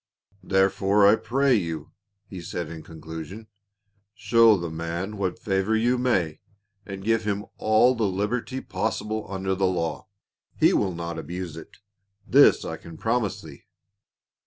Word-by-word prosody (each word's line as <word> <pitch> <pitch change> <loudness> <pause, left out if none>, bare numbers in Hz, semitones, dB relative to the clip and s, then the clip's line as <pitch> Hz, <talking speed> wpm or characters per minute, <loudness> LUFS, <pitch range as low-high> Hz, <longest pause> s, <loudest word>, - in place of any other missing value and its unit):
"Therefore 95 +1 +3
I 100 +2 +7
pray 130 +5 +1
you," 85 -8 -2 0.3
he 95 -2 -9
said 85 -1 -5
in 80 -1 -8
conclusion, 80 +6 -9 0.7
"show 115 0 +5
the 85 -2 -5
man 85 +5 -4
what 95 -3 -2
favor 100 -1 0
you 120 +3 +2
may, 95 -11 0 0.5
and 95 -1 -7
give 115 +1 +1
him 105 0 -2
all 110 +4 +4
the 115 -4 0
liberty 115 +7 -2
pos 95 +5 -2
sible 110 -2 -5
under 95 0 -1
the 95 0 +1
law; 85 -3 -2 0.5
he - - +4
will 95 -4 0
not 85 -1 -5
abuse 90 -1 -6
it, 80 - -12 0.5
this - - +5
I - - -4
can 85 -1 -12
promise 115 -1 -1
thee." 75 -3 -13
95 Hz, 150 wpm, -25 LUFS, 85-110 Hz, 0.7 s, I